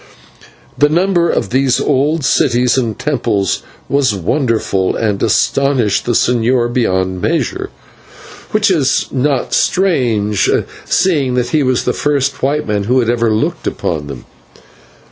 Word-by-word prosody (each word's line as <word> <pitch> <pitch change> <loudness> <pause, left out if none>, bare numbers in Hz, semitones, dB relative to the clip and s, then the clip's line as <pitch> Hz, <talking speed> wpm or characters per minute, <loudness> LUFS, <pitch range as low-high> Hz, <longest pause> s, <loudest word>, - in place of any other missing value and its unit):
The 145 - +4
number 175 +1 +1
of - - -1
these 130 -1 +2
old 145 +2 0
cities 125 -1 +2
and 115 -5 -1
temples 115 - -1 0.3
was 135 -6 +1
wonderful, 105 - -1
and 105 -3 -1
astonished 125 0 +1
the 120 - 0
señor 120 +1 +1
beyond 95 -6 0
measure, 370 - -1 0.8
which 215 -3 +2
is 150 -7 +1
not 135 0 -1
strange, 120 - +1 0.4
seeing 150 -9 +1
that 125 -1 0
he 155 - +1
was 130 -2 +1
the - - 0
first 140 -1 -1
white 145 +3 0
man 105 -2 -1
who 125 +4 +2
had 120 -1 +1
ever 120 -1 +1
looked 150 +11 -1
upon 75 -4 -3
them. 70 - -9
130 Hz, 135 wpm, -15 LUFS, 110-150 Hz, 0.8 s, The